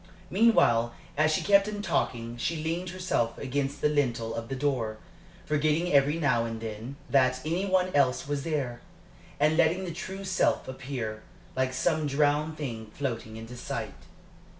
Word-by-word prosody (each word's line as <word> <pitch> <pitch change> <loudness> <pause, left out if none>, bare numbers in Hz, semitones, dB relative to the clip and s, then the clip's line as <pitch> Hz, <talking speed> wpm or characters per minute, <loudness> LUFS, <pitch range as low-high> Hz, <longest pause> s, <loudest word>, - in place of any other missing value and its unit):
Meanwhile, 120 - +4 0.2
as 155 +2 +3
she - - +1
kept 200 0 +5
him 205 -1 -4
talking, 120 - -1
she 145 +7 -1
leaned 170 +3 -2
herself 175 -11 -1
against 140 +1 -2
the - - +4
lintel 120 -6 0
of 115 0 -5
the 135 - -2
door, 125 -6 -1 0.5
forgetting 155 +3 +1
every 140 +2 +4
now 130 -7 +2
and 115 -1 -4
then 110 +4 -6
that 130 -2 +3
any 175 +5 0
one 185 -1 +2
else 140 -2 +2
was 145 -1 -1
there, 135 -7 -2 0.6
and 150 +2 +3
letting 170 +3 +3
the 170 - -4
true 190 +3 -6
self 190 -1 +1
appear, 125 -5 -5 0.3
like 130 0 +1
some 155 +4 +1
drowned 150 +2 +1
thing 115 -7 -5
floating 115 -5 -3
into 115 +2 -8
sight. 125 - -4
145 Hz, 160 wpm, -28 LUFS, 120-165 Hz, 0.6 s, kept